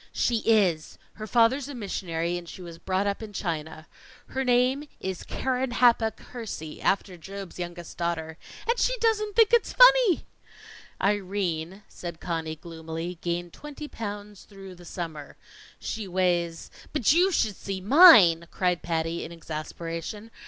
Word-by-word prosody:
"She 235 - +1
is! 190 -8 +2 0.2
Her 215 0 -8
father's 240 +4 +3
a 285 - -7
missionary, 175 -6 -3
and 175 -1 -7
she 185 - -9
was 170 -1 -10
brought 190 +2 -1
up 200 +1 -2
in 215 -2 -8
China. 160 -4 -4 0.4
Her 265 - -2
name 255 +3 +2
is 190 -2 -4
Keren 260 -1 -2
happuch 230 -3 +3
Hersey, 215 -11 -8
after 190 -2 0
Job's 195 +1 -9
youngest 175 -1 -7
daughter. 165 -1 -3 0.3
And 470 +1 +1
she - - +1
doesn't 430 -3 0
think 455 -1 +5
it's 470 - +3
funny!" - - +6 0.7
"Irene," 195 -2 -1
said 170 -2 -8
Conny 160 -2 -3
gloomily, 165 +1 -7
"gained 175 0 -3
twenty 295 0 -9
pounds 205 -4 -7
through 195 -2 -11
the 175 -1 -15
summer. 160 -4 -7 0.4
She 215 -2 -5
weighs 175 -2 -1
" - - -21
"But 285 -3 +3
you 360 +4 +4
should 220 - +1
see 195 0 -5
mine!" 200 - +8
cried 180 -2 0
Patty, 165 0 -2
in - - -8
exasperation. 165 +6 -6
190 Hz, 150 wpm, -26 LUFS, 170-240 Hz, 0.7 s, mine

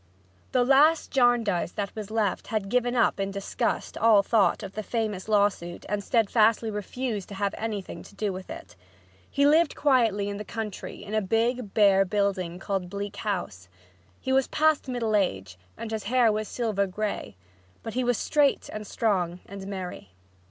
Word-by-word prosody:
The 250 -1 +3
last 290 +5 +4
Jarndyce 240 -9 +2
that 200 -2 -4
was 215 -2 -6
left 215 -3 -1
had 215 -3 -2
given 245 +1 +1
up 235 - +2
in 195 0 -1
disgust 195 0 -2
all 220 -3 +5
thought 205 -1 +2
of 195 -1 -7
the 215 - -3
famous 215 -3 -3
lawsuit 200 -5 +1
and 205 0 -2
steadfastly 225 0 +2
refused 210 0 -4
to 200 - -7
have 200 0 -1
anything 215 -4 -5
to 200 - -15
do 200 -1 -2
with 185 0 -8
it. 330 +1 -9 0.5
He 280 0 +2
lived 310 +2 +4
quietly 230 -8 +2
in 200 0 -4
the 210 - -5
country 215 -3 -6
in 205 +1 -8
a 215 - +2
big, 225 +2 0
bare 200 -2 +5
building 195 -3 -1
called 190 -1 -3
Bleak 200 +1 -5
House. 140 - -4 0.5
He 265 - -2
was 265 -1 +3
past 310 -2 +2
middle 235 -4 -1
age, 95 - -1 0.2
and 225 - -6
his 220 -1 -3
hair 240 0 +4
was 215 0 -2
silver 210 -4 -1
gray, 205 - -4 0.5
but 225 - -5
he 255 - 0
was 245 -2 +1
straight 290 -3 +1
and 215 -1 -6
strong 180 -6 0
and 195 0 -8
merry. 180 - -7
210 Hz, 175 wpm, -26 LUFS, 195-235 Hz, 0.5 s, all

